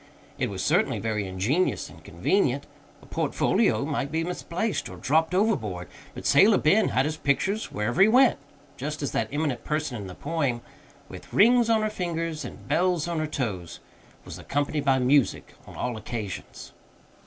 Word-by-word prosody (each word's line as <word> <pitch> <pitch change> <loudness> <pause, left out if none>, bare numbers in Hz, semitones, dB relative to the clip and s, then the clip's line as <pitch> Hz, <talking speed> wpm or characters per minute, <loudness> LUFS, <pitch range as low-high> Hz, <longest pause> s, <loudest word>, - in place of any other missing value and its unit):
It - - 0
was - - -4
certainly - - +2
very 105 -3 -2
ingenious 110 - 0
and - - -15
convenient. 135 - 0 0.4
A - - -14
portfolio - - +1
might 140 - -2
be 160 +1 0
misplaced, 180 +4 -3
or - - -9
dropped 160 +5 +1
overboard; 110 - 0 0.3
but - - -8
Sailor 200 +9 +6
Ben 200 +8 +3
had 130 +2 +1
his 155 +1 -2
pictures 190 +10 0
wherever 105 - -1
he 195 - +8
went, 255 +3 +5 0.4
just 150 +3 -4
as 135 - -2
that 110 - -1
eminent 145 -4 -2
person 150 -4 -2
in 100 - -7
the 90 - -9
poem, 145 -6 -2 0.5
"With - - -11
rings 235 +2 +5
on 220 -1 +3
her 215 - +1
fingers 165 -4 -3
and - - -10
bells 175 -2 +1
on 170 -2 -2
her 155 - -1
toes" 100 - -4 0.5
was - - -8
accompanied 145 +1 -2
by 135 -1 +4
music 130 +1 +2
on - - -11
all 125 -1 -3
occasions. 110 -3 -6
150 Hz, 170 wpm, -26 LUFS, 120-180 Hz, 0.5 s, he